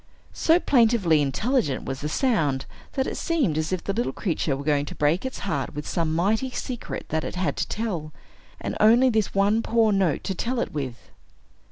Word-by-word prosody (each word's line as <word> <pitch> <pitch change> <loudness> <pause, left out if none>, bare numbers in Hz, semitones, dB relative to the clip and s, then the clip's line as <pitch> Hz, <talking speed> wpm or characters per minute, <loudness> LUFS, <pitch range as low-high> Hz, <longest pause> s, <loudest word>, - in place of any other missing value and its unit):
So 330 +2 +3
plaintively 225 - +3
intelligent 145 - 0
was 135 0 -4
the 150 - -2
sound, 150 - +1 0.3
that 265 -2 0
it - - -4
seemed 285 - 0
as 155 +2 -1
if 185 -2 -2
the 195 - -2
little 235 +4 -1
creature 160 -7 -1
were 140 - -6
going 145 -1 +1
to - - -7
break 160 - +1
its 260 - -7
heart 195 - -2
with 150 - -5
some 165 -3 -1
mighty 215 +9 +1
secret 250 -1 -5
that 160 0 -1
it - - -5
had 180 0 -1
to - - -1
tell, 180 -9 -3 0.5
and - - -4
only 240 +4 +6
this 220 -4 0
one 205 +3 +3
poor 225 -1 +2
note 190 -7 +1
to 195 - -2
tell 240 +6 -2
it - - -2
with. 130 -5 -5
195 Hz, 200 wpm, -25 LUFS, 150-235 Hz, 0.5 s, only